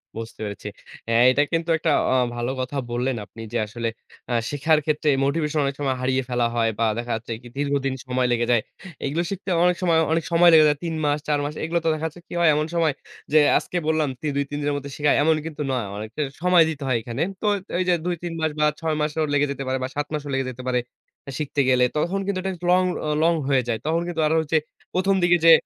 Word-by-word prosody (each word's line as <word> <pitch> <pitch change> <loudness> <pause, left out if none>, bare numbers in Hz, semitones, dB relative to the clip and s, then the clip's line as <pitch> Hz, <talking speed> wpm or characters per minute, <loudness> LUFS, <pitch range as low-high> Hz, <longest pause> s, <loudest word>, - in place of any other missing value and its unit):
বুঝতে 115 0 -7
পেরেছি। 100 0 -6 0.4
হ্যাঁ, 115 +1 +4
এটা 145 +3 +3
কিন্তু 165 +1 0
একটা 160 -1 0 0.2
অ - - +3 0.2
ভালো 120 +1 -2
কথা 130 +3 -4
বললেন 125 +2 0
আপনি 115 +2 -12
যে - - +1
আসলে 115 +1 -4 0.4
অ্যা 120 - -1
শিখার 150 +2 +2
ক্ষেত্রে 155 -1 +1 0.2
মোটিভেশন 150 +1 0
অনেক 140 0 -2
সময় 135 -2 0
হারিয়ে 130 +1 +1
ফেলা 120 -1 +1
হয় 115 -1 +2
বা 115 - +3
দেখা 120 0 -4
যাচ্ছে 115 +1 -7
একটি 120 +1 -13
দীর্ঘদিন 140 -1 0
সময় 125 0 +1
লেগে 120 0 +1
যায়। 120 -3 +4 0.4
এগুলো 155 +5 0
শিখতে 195 0 -5
অনেক 180 0 +4
সময়, 170 -3 +3
অনেক 165 0 +1
সময় 170 +1 +6
লেগে 155 -1 +8
যায়। 150 -1 +2
৩ 165 - -2
মাস, 145 +1 +1
৪ 145 -1 +2
মাস 145 - -3
এগুলো 170 +2 0
তো - - +4
দেখা 155 +1 -4
যাচ্ছে 160 +2 -11
কি - - -10
হয় 170 -2 +5
এমন 150 - +1
সময় 160 -3 +2 0.4
যে 155 - +7 0.2
আজকে 180 - -3
বললাম 155 -2 +1
তি 155 - -2
২-৩ 140 +1 -2
দিনের 145 0 0
মধ্যে 140 0 -7
শিখায় 145 0 +3
এমন 160 +1 +4
কিন্তু 155 -2 -6
নয়। 125 -5 -1
অনেকটা 110 +7 -5 0.2
সময় 180 -2 +6
দিতে 145 -3 -5
হয় 130 -3 +2
এখানে। 120 +4 -5 0.2
তো 210 - 0 0.3
এই 185 - +2
যে - - +5
২-৩ 175 -1 -3
মাস 160 - +1
বা 150 - +4
৬ 160 -2 -1
মাসও 150 +1 0
লেগে 145 0 +3
যেতে 140 0 -4
পারে 130 0 0
বা - - -1
৭ 145 0 -2
মাসও 145 -1 -3
লেগে 135 0 0
যেতে 125 +1 -10
পারে, 125 -1 +2 0.6
শিখতে 145 -1 0
গেলে 125 -1 +4
তখন 180 +6 0
কিন্তু 195 -2 -1
এটা 190 - -1 0.2
লং 185 +1 +5 0.2
ও - - 0
লং 170 +1 +4
হয়ে 135 -2 +3
যায়। 115 -2 -1
তখন 165 +2 +1
কিন্তু 170 -2 -2
আরো 160 - +1
হচ্ছে 160 +1 +1 0.4
১ম, 190 +2 +2
দিকে 175 0 +5
যে 165 - +9
145 Hz, 235 wpm, -23 LUFS, 130-160 Hz, 0.6 s, যে